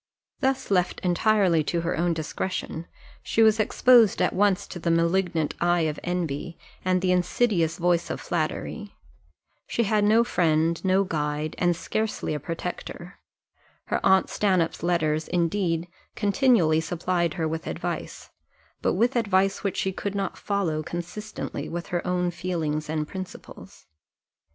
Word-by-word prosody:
Thus 265 -3 0
left 180 -2 +1
entirely 180 -2 +3
to 170 +2 0
her 170 - -1
own 170 +1 +1
discretion, 160 +1 -4 0.3
she 225 - +2
was 220 0 +5
exposed 230 0 +5
at - - +2
once 200 -1 +2
to 175 - -8
the 170 - -1
malignant 165 -1 +1
eye 175 0 +3
of 155 -2 -1
envy, 175 -2 -3 0.3
and 185 0 +1
the 185 - +3
insidious 180 -2 +1
voice 175 -1 +1
of - - -3
flattery 185 +6 -3 0.7
she 235 - 0
had 210 0 +2
no 220 +3 +5
friend, 165 -5 +1
no 190 +1 +3
guide, 150 -3 -2
and 175 -1 +2
scarcely 215 +1 -2
a 150 - -2
protector: 175 +3 -6 0.7
her - - 0
aunt 190 -1 +4
Stanhope's 185 -5 +1
letters, 160 -3 0
indeed, 170 -1 0 0.3
continually 205 - +3
supplied 170 0 -1
her 160 -2 -1
with 160 +1 -4
advice, - - -5 0.5
but - - +1
with 235 +7 +1
advice 195 -4 +1
which 200 -3 -2
she 190 - 0
could 200 +2 -4
not 195 -1 -2
follow 185 -7 -1
consistently 175 -2 -6
with 170 +1 -5
her 175 -1 -1
own 180 -1 0
feelings 160 -4 -3
and 155 -1 -1
principles. 185 +1 -9
175 Hz, 145 wpm, -25 LUFS, 165-195 Hz, 0.7 s, was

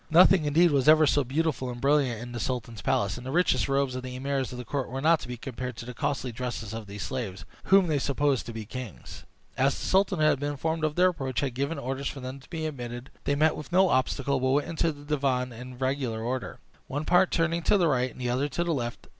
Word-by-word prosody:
Nothing, 175 0 +6
indeed, 165 +4 +4
was 140 0 +3
ever 155 0 +7
seen - - +3
so 145 - +3
beautiful 135 0 -1
and 120 -1 -6
brilliant 135 -4 +2
in 120 - -8
the 120 - -5
sultan's 115 -3 -3
palace, 125 -8 0
and 125 - -8
the - - -3
richest 175 -2 +2
robes 135 -1 +1
of 130 - -3
the 125 0 -7
emirs 135 0 -2
of 125 - -7
his 125 - -6
court 135 +2 -3
were 130 +2 -4
not 160 +3 +4
to - - -8
be 125 0 -5
compared 125 -1 -6
to - - -7
the 125 - -7
costly 140 -1 -2
dresses 115 -2 -5
of 110 -2 -6
these 100 0 -6
slaves, 110 -8 -4 0.2
whom 195 -1 +6
they 155 -4 +1
supposed 140 -1 0
to - - -5
be 110 -1 -6
kings. 125 -1 -8 0.3
As 135 +1 +3
the - - -5
sultan, 195 0 +2
who 155 - +3
had 145 - +3
been 145 +1 -2
informed 160 +3 -2
of 155 -1 0
their 180 +1 +5
approach, 135 -8 -3
had 135 -3 -1
given 140 +6 -2
orders 135 +2 -3
for 135 - -5
them 130 +1 -6
to 135 - -19
be 160 -2 -4
admitted, 120 -3 -6
they 140 - +2
met 155 +2 +3
with 150 +2 -8
no 185 +1 +5
obstacle, 135 +1 +1
but 130 0 +1
went 145 +2 +2
into 165 0 0
the 145 -1 -12
divan 135 -4 0
in 125 +2 -9
regular 130 -4 -1
order, 125 +2 -3 0.3
one 145 +3 -3
part 180 +2 +4
turning 165 0 +1
to 205 - +3
the 175 -3 +3
right, 130 -3 +1
and - - -14
the 125 - -2
other 130 +4 0
to 170 +5 -1
the 170 -1 0
left. 120 -4 -4
135 Hz, 265 wpm, -27 LUFS, 125-155 Hz, 0.3 s, ever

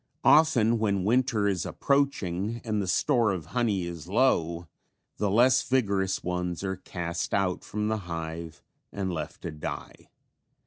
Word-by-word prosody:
Often 120 -8 +5
when 100 -3 +1
winter 115 -1 +2
is 95 -4 0
approaching 115 -7 0
and 110 -3 -1
the 95 - -3
store 120 +2 +2
of 90 -6 -4
honey 110 -7 +1
is 85 -1 -7
low 85 -7 +1 0.5
the 105 - 0
less 125 +5 +5
vigorous 100 -7 0
ones 90 0 -2
are 95 -1 -2
cast 85 -2 -3
out 95 -2 0
from 105 0 -3
the 110 0 0
hive 80 0 -6 0.3
and 95 -2 -3
left 80 -1 -6
to 85 - -4
die. 75 0 -7
100 Hz, 145 wpm, -27 LUFS, 85-115 Hz, 0.5 s, Often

